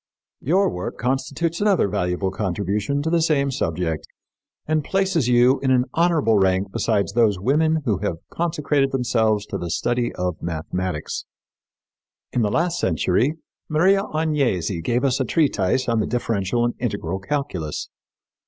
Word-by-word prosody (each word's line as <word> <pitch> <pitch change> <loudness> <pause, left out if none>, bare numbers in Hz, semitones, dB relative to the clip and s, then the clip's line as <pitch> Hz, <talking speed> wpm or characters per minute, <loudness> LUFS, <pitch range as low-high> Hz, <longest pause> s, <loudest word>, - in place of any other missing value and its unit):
Your 185 +8 +2
work 90 0 -4
constitutes 135 - -1
another 200 - +3
valuable 95 -1 -1
contribution 105 +7 -1
to 160 - -1
the 170 -1 +3
same 140 -4 +2
subject 80 -7 -2 0.6
and 155 -1 0
places 190 -6 +1
you 125 +2 +4
in 135 - -1
an 125 -1 +3
honorable 160 -11 +3
rank 95 +1 +1
beside 105 0 +1
those 110 -4 +3
women 155 +8 +2
who 105 -7 +1
have - - -1 0.2
consecrated 150 -5 0
themselves 110 -5 +1
to - - -5
the 85 - -4
study 120 +7 0
of 90 -2 -3
mathematics. 85 0 -3 1.1
In 125 - +1
the 105 - +2
last 170 +9 0
century 95 - +1 0.3
Maria 185 +6 +4
Agnesi 135 - 0
gave 120 +7 0
us 135 -1 +1
a - - +2
treatise 130 - +1
on 115 -2 +1
the 110 - 0
differential 115 -1 0
and 120 - 0
integral 100 -6 -2
calculus. 95 - -3
120 Hz, 145 wpm, -22 LUFS, 95-150 Hz, 1.1 s, you